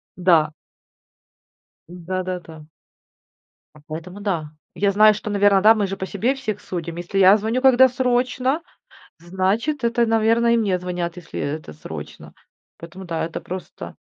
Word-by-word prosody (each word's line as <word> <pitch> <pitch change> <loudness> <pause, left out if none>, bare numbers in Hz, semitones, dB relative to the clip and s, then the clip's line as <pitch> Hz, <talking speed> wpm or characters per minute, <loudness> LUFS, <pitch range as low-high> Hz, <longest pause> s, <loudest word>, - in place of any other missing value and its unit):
Да. 170 -4 +3 1.4
Да-да-да. 180 -2 -6 1.2
Поэтому 175 +5 -8
да. 170 -7 -2 0.2
Я 200 0 +1
знаю, 215 +1 +6
что, 210 0 -6
наверно, 200 -1 +4
да, 220 +1 +7
мы 205 -2 0
же 195 +1 -5
по 190 - -5
себе 230 +8 -1
всех 215 -7 -5
судим. 170 -3 -6
Если 175 +3 -4
я 195 +2 +7
звоню, 220 +4 -1
когда 260 -1 +6
срочно, 255 +4 0 0.6
значит, 190 - -1
это, 235 0 +2
наверное, 225 +1 +3
и - - +3
мне 200 -5 +1
звонят, 175 -1 -4
если 175 - -8
это 150 - -4
срочно. 75 - -10 0.4
Поэтому 175 +3 -10
да, 165 -2 -3
это 165 - -5
просто 185 +1 -8
195 Hz, 140 wpm, -21 LUFS, 175-225 Hz, 1.4 s, да